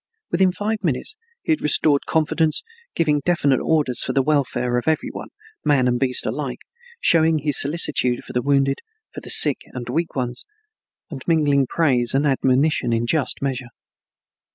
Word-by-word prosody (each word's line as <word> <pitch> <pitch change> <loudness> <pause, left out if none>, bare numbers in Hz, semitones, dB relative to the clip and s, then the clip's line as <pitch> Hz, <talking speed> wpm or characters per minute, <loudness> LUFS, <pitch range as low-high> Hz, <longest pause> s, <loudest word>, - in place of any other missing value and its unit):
Within 185 +1 +3
five 210 +3 -3
minutes 150 - -1 0.3
he - - -1
had 315 - +1
restored 150 -1 +2
confidence, 160 0 +1 0.3
giving 150 -3 +1
definite 145 -6 +1
orders 150 -6 0
for - - -2
the 135 - +2
welfare 125 -4 0
of 120 - -11
every 160 -1 0
one, - - -8 0.4
man 135 -4 +2
and 120 -1 0
beast 130 -2 +1
alike, 140 -4 -4 0.4
showing 160 - +3
his 145 -1 +2
solicitude 140 -5 +1
for - - -10
the 125 - 0
wounded, 140 0 +1 0.3
for - - -8
the - - -10
sick - - +5
and 125 -2 -7
weak 165 +6 -2
ones, 125 -2 -3 0.7
and 135 -4 -7
mingling 145 -5 +2
praise 130 -7 +2
and 140 +2 +2
admonition 135 -1 +1
in 115 0 0
just 140 +1 -1
measure. 130 -3 -3
140 Hz, 165 wpm, -21 LUFS, 125-160 Hz, 0.7 s, sick